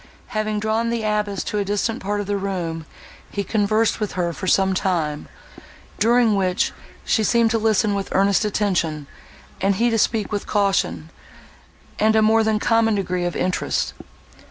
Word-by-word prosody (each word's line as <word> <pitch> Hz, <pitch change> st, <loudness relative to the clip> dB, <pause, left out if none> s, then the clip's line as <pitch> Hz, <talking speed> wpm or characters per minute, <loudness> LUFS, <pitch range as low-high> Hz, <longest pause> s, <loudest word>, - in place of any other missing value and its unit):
Having 215 Hz, -2 st, -1 dB
drawn 220 Hz, +2 st, 0 dB
the 230 Hz, -1 st, -2 dB
abbess 210 Hz, -2 st, -1 dB
to 210 Hz, -, -2 dB
a -, -, +1 dB
distant 205 Hz, +4 st, -1 dB
part 205 Hz, +2 st, -2 dB
of 205 Hz, -, -3 dB
the 205 Hz, +1 st, -1 dB
room, 175 Hz, -5 st, -3 dB, 0.4 s
he 200 Hz, -, -3 dB
conversed 215 Hz, +2 st, +1 dB
with 210 Hz, -2 st, -3 dB
her 175 Hz, -2 st, -1 dB
for 185 Hz, -, -6 dB
some 190 Hz, +1 st, +3 dB
time, 165 Hz, -6 st, -1 dB, 0.7 s
during 235 Hz, 0 st, +4 dB
which 185 Hz, -2 st, +1 dB, 0.3 s
she 220 Hz, -, +2 dB
seemed 230 Hz, 0 st, +3 dB
to 225 Hz, -, +1 dB
listen 215 Hz, -1 st, +2 dB
with 200 Hz, -1 st, -3 dB
earnest 195 Hz, +2 st, +3 dB
attention, 180 Hz, -8 st, -1 dB, 0.6 s
and 195 Hz, +1 st, +2 dB
he 235 Hz, +4 st, +2 dB
to 225 Hz, -, +1 dB
speak 215 Hz, -1 st, 0 dB
with 205 Hz, -1 st, -3 dB
caution, 190 Hz, -, 0 dB, 0.9 s
and 220 Hz, +1 st, +3 dB
a 220 Hz, -, +4 dB
more 220 Hz, +1 st, +4 dB
than 220 Hz, -1 st, +1 dB
common 225 Hz, 0 st, +2 dB
degree 180 Hz, -3 st, -1 dB
of 175 Hz, -, -2 dB
interest. 185 Hz, 0 st, -1 dB
205 Hz, 170 wpm, -22 LUFS, 190-220 Hz, 0.9 s, during